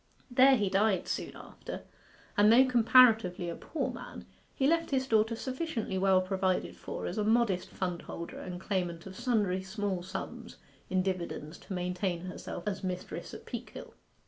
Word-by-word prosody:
There 265 Hz, +2 st, +7 dB
he 210 Hz, -5 st, +1 dB
died 195 Hz, 0 st, +2 dB
soon -, -, -3 dB
after, -, -, -8 dB, 0.5 s
and 205 Hz, +1 st, +6 dB
though 255 Hz, +3 st, +7 dB
comparatively 225 Hz, -7 st, +5 dB
a 170 Hz, -, -4 dB
poor 325 Hz, -, -3 dB
man, -, -, -9 dB, 0.3 s
he 270 Hz, -, +1 dB
left 330 Hz, +3 st, +2 dB
his 265 Hz, -2 st, +1 dB
daughter 220 Hz, -1 st, +2 dB
sufficiently 255 Hz, -, -3 dB
well 190 Hz, -1 st, +4 dB
provided 185 Hz, 0 st, 0 dB
for -, -, -6 dB
as 185 Hz, -, -3 dB
a -, -, +2 dB
modest 215 Hz, -4 st, +2 dB
fundholder 175 Hz, -2 st, -5 dB
and 180 Hz, -1 st, -6 dB
claimant 175 Hz, -4 st, -2 dB
of 190 Hz, -1 st, -9 dB
sundry 205 Hz, -6 st, +1 dB
small 190 Hz, -1 st, -3 dB
sums 185 Hz, +2 st, -7 dB, 0.3 s
in 185 Hz, 0 st, +2 dB
dividends 175 Hz, -4 st, -4 dB
to -, -, -8 dB
maintain 180 Hz, -1 st, -2 dB
herself 180 Hz, -1 st, -6 dB
as 205 Hz, -1 st, -2 dB
mistress 180 Hz, -1 st, -4 dB
at -, -, -11 dB
Peakhill. -, -, -8 dB
195 Hz, 160 wpm, -31 LUFS, 180-230 Hz, 0.5 s, There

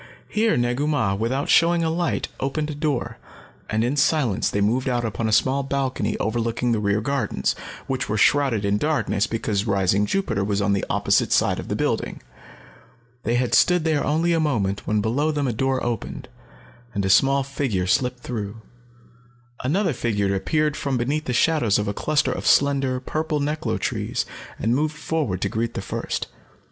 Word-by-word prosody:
Here 220 Hz, +1 st, +1 dB
Negu 120 Hz, +4 st, 0 dB
Mah, 130 Hz, -10 st, +1 dB
without 115 Hz, +7 st, -1 dB
showing 170 Hz, 0 st, +4 dB
a 160 Hz, -, +1 dB
light, 170 Hz, 0 st, -1 dB
opened 150 Hz, +3 st, -2 dB
a -, -, -4 dB
door, 145 Hz, -3 st, -2 dB, 0.5 s
and 110 Hz, +1 st, +1 dB
in 125 Hz, +4 st, 0 dB
silence 140 Hz, -7 st, +2 dB
they 100 Hz, -, -1 dB
moved 120 Hz, +6 st, +1 dB
out 120 Hz, -1 st, 0 dB
upon 110 Hz, +1 st, -2 dB
a -, -, -1 dB
small 130 Hz, +5 st, +3 dB
balcony 135 Hz, -1 st, -1 dB
overlooking 115 Hz, +2 st, -1 dB
the 115 Hz, -, +1 dB
rear 105 Hz, 0 st, +1 dB
gardens, 140 Hz, +4 st, -1 dB, 0.3 s
which 130 Hz, -3 st, -2 dB
were 105 Hz, -, 0 dB
shrouded 130 Hz, -4 st, +3 dB
in 100 Hz, +1 st, +1 dB
darkness 150 Hz, -9 st, 0 dB
because 110 Hz, -2 st, -1 dB
rising 100 Hz, +1 st, +2 dB
Jupiter 115 Hz, -, 0 dB
was 100 Hz, 0 st, 0 dB
on 100 Hz, 0 st, +1 dB
the 100 Hz, -, 0 dB
opposite -, -, +2 dB
side -, -, +2 dB
of -, -, -7 dB
the -, -, -2 dB
building. -, -, -1 dB, 1.0 s
They 120 Hz, -, 0 dB
had 125 Hz, 0 st, 0 dB
stood 180 Hz, -2 st, +4 dB
there 155 Hz, -3 st, +1 dB
only 165 Hz, +3 st, +1 dB
a 165 Hz, -, +2 dB
moment 105 Hz, -11 st, -1 dB
when 105 Hz, 0 st, +1 dB
below 130 Hz, +9 st, 0 dB
them 145 Hz, -3 st, 0 dB
a 120 Hz, -, 0 dB
door 130 Hz, +3 st, 0 dB
opened, 120 Hz, -2 st, -4 dB, 0.7 s
and 100 Hz, -1 st, 0 dB
a -, -, 0 dB
small 135 Hz, +6 st, +4 dB
figure 130 Hz, -9 st, -2 dB
slipped 125 Hz, +6 st, 0 dB
through. 110 Hz, -3 st, -5 dB, 1.0 s
Another 170 Hz, +6 st, +1 dB
figure 100 Hz, -5 st, 0 dB
appeared 150 Hz, -, 0 dB
from 140 Hz, -3 st, -1 dB
beneath 140 Hz, +6 st, -1 dB
the -, -, -2 dB
shadows 125 Hz, -6 st, +3 dB
of 105 Hz, -, -1 dB
a 100 Hz, -, -1 dB
cluster 150 Hz, +2 st, +1 dB
of -, -, -3 dB
slender, 135 Hz, -2 st, +3 dB
purple 155 Hz, +3 st, -2 dB
neklo 150 Hz, +2 st, -1 dB
trees -, -, -2 dB, 0.3 s
and 115 Hz, +2 st, 0 dB
moved 150 Hz, +2 st, 0 dB
forward 150 Hz, -, -2 dB
to -, -, 0 dB
greet 115 Hz, +1 st, -2 dB
the -, -, -2 dB
first. -, -, -3 dB
130 Hz, 180 wpm, -23 LUFS, 110-150 Hz, 1.0 s, showing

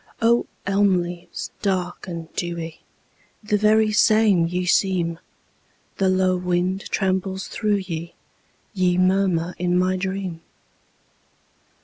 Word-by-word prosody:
O 235 Hz, +1 st, +3 dB, 0.2 s
elm 195 Hz, -2 st, +3 dB
leaves 175 Hz, 0 st, -7 dB
dark 185 Hz, -2 st, -2 dB
and 165 Hz, -2 st, -7 dB
dewy, 170 Hz, -2 st, -4 dB, 0.6 s
The 210 Hz, 0 st, 0 dB
very 215 Hz, +1 st, +3 dB
same 215 Hz, -5 st, +4 dB
ye 180 Hz, +1 st, -2 dB
seem, 180 Hz, -3 st, +1 dB, 0.8 s
The 190 Hz, -1 st, +2 dB
low 185 Hz, -1 st, +2 dB
wind 180 Hz, +1 st, -1 dB
trembles 190 Hz, 0 st, -1 dB
through 210 Hz, -3 st, -1 dB
ye, 170 Hz, -1 st, -6 dB, 0.6 s
Ye 180 Hz, -3 st, +2 dB
murmur 185 Hz, -2 st, +2 dB
in 180 Hz, 0 st, +1 dB
my 185 Hz, +1 st, +1 dB
dream! 190 Hz, -3 st, -4 dB
185 Hz, 110 wpm, -23 LUFS, 175-195 Hz, 0.8 s, same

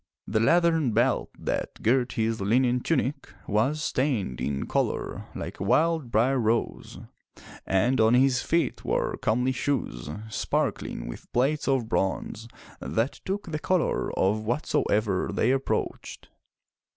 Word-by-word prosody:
The 110 Hz, -, 0 dB
leathern 165 Hz, 0 st, +3 dB
belt -, -, +2 dB
that -, -, -4 dB
girt 125 Hz, +2 st, +2 dB
his 110 Hz, -3 st, -1 dB
linen 125 Hz, +5 st, +2 dB
tunic 145 Hz, +1 st, -1 dB, 0.2 s
was 130 Hz, +9 st, +1 dB
stained 125 Hz, -, -1 dB
in 70 Hz, -1 st, -2 dB
color -, -, -2 dB
like -, -, -6 dB
a -, -, -2 dB
wild 160 Hz, -5 st, +2 dB
briar 125 Hz, +5 st, +2 dB
rose, 115 Hz, 0 st, -1 dB, 0.7 s
and 115 Hz, +6 st, +2 dB
on 110 Hz, +2 st, +5 dB
his 130 Hz, -1 st, +3 dB
feet 170 Hz, 0 st, 0 dB
were -, -, 0 dB
comely 125 Hz, +3 st, +1 dB
shoes 120 Hz, -, -2 dB, 0.2 s
sparkling 105 Hz, -, -2 dB
with -, -, -9 dB
plates 140 Hz, +5 st, +1 dB
of 135 Hz, -4 st, +1 dB
bronze 110 Hz, +2 st, -2 dB, 0.3 s
that 115 Hz, -, -2 dB
took 195 Hz, -2 st, -3 dB
the 155 Hz, -, -2 dB
color 185 Hz, +1 st, 0 dB
of 100 Hz, +3 st, +2 dB
what 120 Hz, +8 st, -2 dB
soever 105 Hz, -3 st, +1 dB
they -, -, +2 dB
approached. 135 Hz, 0 st, -2 dB
125 Hz, 135 wpm, -26 LUFS, 110-140 Hz, 0.7 s, on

